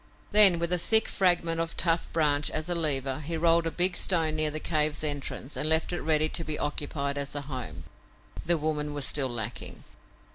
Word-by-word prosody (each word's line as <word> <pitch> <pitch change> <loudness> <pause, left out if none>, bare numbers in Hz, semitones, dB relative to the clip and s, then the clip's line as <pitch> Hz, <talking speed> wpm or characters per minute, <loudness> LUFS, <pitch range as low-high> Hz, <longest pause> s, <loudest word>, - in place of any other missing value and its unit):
Then, 205 -4 +7
with 170 +1 -2
a 180 - +1
thick 220 +5 +3
fragment 170 -3 +1
of 165 0 -5
tough 165 -1 +1
branch 150 -2 +1
as 155 +1 -4
a 175 - -1
lever, 140 -5 0
he 165 +2 -5
rolled 165 0 +2
a - - 0
big 180 +2 +1
stone 165 -4 +1
near 155 0 +1
the 155 +1 -5
cave's 155 -1 -1
entrance 145 -2 -4
and 155 - -1
left 160 +2 +3
it 175 - -4
ready 155 0 +1
to 165 - -1
be 155 -1 -3
occupied 140 -1 -3
as 140 0 -5
a 145 - -3
home. 130 -3 -7 0.6
The 170 0 +2
woman 150 -1 -3
was 145 -2 +1
still 135 -3 +2
lacking. 120 -1 -6
155 Hz, 205 wpm, -27 LUFS, 145-170 Hz, 0.6 s, Then